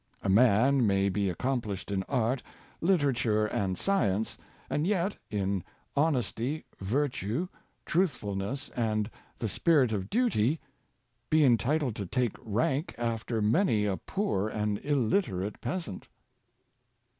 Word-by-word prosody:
A - - 0
man 120 +4 +5
may 100 0 +3
be 100 0 0
ac 90 - -3
complished 110 -5 -2
in 95 -1 0
art, 125 -1 +1 0.4
literature, 135 - +2
and 95 -3 -1
science, 110 - +1 0.3
and 150 +3 0
yet, 195 -1 +1
in 100 -3 -1 0.3
honesty, 140 -1 0
virtue, 125 - -1 0.4
truthfulness, 135 - -1
and 110 -2 -1 0.3
the 115 - -2
spirit 135 - +3
of 100 -3 -2
duty, 165 - +2 0.7
be 155 -1 +5
entitled 125 +2 +2
to 100 - -4
take 125 +3 0
rank 125 - -1
after 115 -1 -1
many 110 - +3
a 100 -2 +1
poor 110 - -1
and 105 -1 -1
illiterate 110 - 0
peasant. 165 - -4
115 Hz, 120 wpm, -29 LUFS, 105-145 Hz, 0.7 s, man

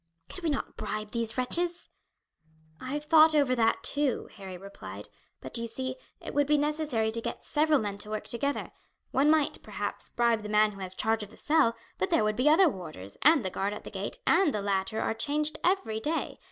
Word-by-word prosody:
"Could 370 - -7
we 330 - +1
not 285 - -3
bribe 215 0 -4
these 230 -1 -1
wretches?" 345 +7 -1 0.9
"I 260 +2 -4
have 295 - -3
thought 315 0 +6
over 280 -4 +3
that 225 -2 +2
too," 285 -3 0
Harry 190 -2 -8
replied; 195 +2 -9 0.3
"but, - - -4
you 230 - -3
see, 260 +3 -3 0.2
it - - -7
would 290 -1 +2
be 300 0 +4
necessary 290 -7 0
to 230 +1 -1
get - - -5
several 305 0 +3
men 205 -4 -3
to 210 - -6
work 215 0 -3
together. 280 +4 -2 0.4
One 280 +3 +3
might, 310 -2 +2
perhaps, 205 -1 -5
bribe 235 -2 +2
the 210 - -7
man 210 0 +4
who 195 - -12
has 185 -1 -3
charge 225 +2 +1
of 205 - -7
the - - -16
cell, 295 -7 +3 0.2
but 185 - 0
there - - +3
would 215 0 +1
be 255 +6 +3
other 350 +4 +6
warders, 155 - -6
and 300 -7 +5
the 185 - -1
guard 200 +3 -1
at 210 - -8
the - - -9
gate, - - -4
and 375 -6 +4
the 210 - -1
latter 200 +2 -1
are - - 0
changed 300 +5 0
every 360 - +1
day. 310 +8 -2
235 Hz, 215 wpm, -29 LUFS, 210-300 Hz, 0.9 s, thought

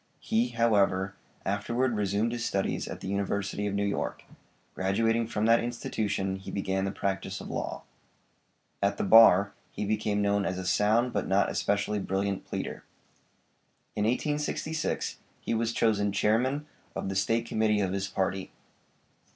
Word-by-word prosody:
He, 115 +2 +1
however, 100 -5 +2 0.3
afterward 120 +5 0
resumed 105 +2 0
his 120 -1 -3
studies 100 -4 -1
at - - -7
the - - -5
University 100 +1 -1
of 100 - -2
New 100 0 +1
York; 100 - -2 0.5
graduating 115 +4 +1
from 110 -1 -1
that 115 +1 +5
institution 105 -5 -2
he 95 - -9
began 95 -1 -1
the 100 - -1
practice 100 -1 -3
of - - -7
law. - - -4 1.0
At 100 0 +1
the - - -1
bar 100 -2 +7 0.2
he - - -4
became 105 0 0
known 100 0 +2
as 95 -1 -2
a 95 - -4
sound, 110 +6 +2
but - - -1
not 95 +1 +2
especially 100 +1 0
brilliant 95 0 -2
pleader. - - -5 1.1
In 105 - 0
1866 150 +5 -1 0.2
he - - -3
was 115 0 0
chosen 105 -3 +2
Chairman 125 +9 +1 0.3
of - - -3
the 95 - -3
State 115 +4 +1
Committee 110 -2 +1
of 95 -1 0
his 100 0 -1
party. 95 0 -2
105 Hz, 150 wpm, -29 LUFS, 100-115 Hz, 1.1 s, bar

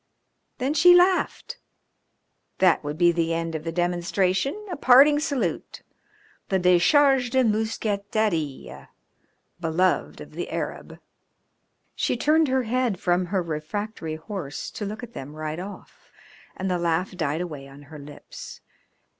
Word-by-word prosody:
Then 270 +2 -1
she 355 +4 +7
laughed. 360 +1 +2 1.0
That 180 -4 +3
would 150 +1 -5
be 175 0 +5
the 165 -1 0
end 165 0 -3
of 155 -1 -4
the 165 - -3
demonstration, 180 - -1
a - - -2
parting 280 +3 +6
salute, 265 - -3 0.7
the 190 - +2
decharge 245 - +4
de 260 +1 +2
mousqueterie 210 - -2 0.7
beloved 175 +2 0
of - - -10
the - - -5
Arab. - - -5 1.0
She - - -1
turned 310 +4 +3
her 260 -1 +1
head 240 -4 -1
from 180 0 +1
her 190 0 -1
refractory 165 +2 -4
horse 160 -3 -6
to 210 - -5
look 215 +4 -7
at 240 -1 -9
them 145 - -8
ride 155 +1 -4
off, 195 +3 -11 0.5
and 190 - -3
the 180 -1 0
laugh 170 +2 -1
died 155 -2 -1
away 150 -6 -6
on 140 +1 -14
her 150 +1 -12
lips. 145 +1 -11
185 Hz, 140 wpm, -24 LUFS, 165-245 Hz, 1.0 s, she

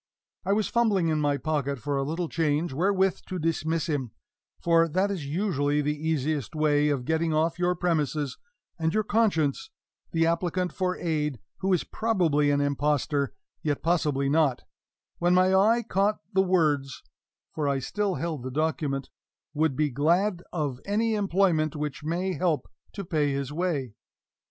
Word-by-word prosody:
I 195 +2 +1
was 210 0 +1
fumbling 210 -8 +2
in 155 -1 +1
my 145 -1 +1
pocket 140 -2 -1
for 145 +3 -3
a 135 - +1
little 165 +5 -2
change 155 -1 0
wherewith 190 +4 +2
to 185 - -4
dismiss 165 -1 -1
him 145 -7 -2 0.5
for 165 -1 +4
that 185 +5 +1
is 165 -8 -4
usually 145 -4 0
the 150 +1 0
easiest 155 -3 -2
way 150 -1 +3
of 135 -4 -1
getting 160 +1 +1
off 165 +2 +1
your 180 0 +2
premises 155 -5 -1 0.4
and 160 +2 0
your 215 - +2
conscience 200 -10 +1 0.4
the 165 0 +2
applicant 175 +2 0
for 185 -1 -1
"aid," 150 -6 -1 0.2
who 195 0 -1
is 180 - +2
probably 170 -10 +1
an 145 0 +2
impostor, 145 -1 0 0.3
yet 145 -2 -2
possibly 150 -5 +1
not 145 -3 +2 0.6
when 175 +1 +3
my 185 +1 +4
eye 220 +5 +4
caught 205 0 +1 0.2
the 190 - +4
words 150 - +1 0.5
(for 150 -2 -1
I 140 -1 +1
still 195 +8 -1
held 165 -5 -3
the 130 - -5
document), 145 -1 -1 0.4
"would 155 -2 +1
be 150 0 +1
glad 175 - +2
of 145 -7 -2
any 220 +3 0
employment 185 -6 +1
which 150 -1 -4
may 175 +4 -1
help 175 -4 0 0.3
to 200 -2 -6
pay 150 -3 +1
his 140 0 -3
way." 150 - -1
160 Hz, 160 wpm, -27 LUFS, 145-180 Hz, 0.6 s, for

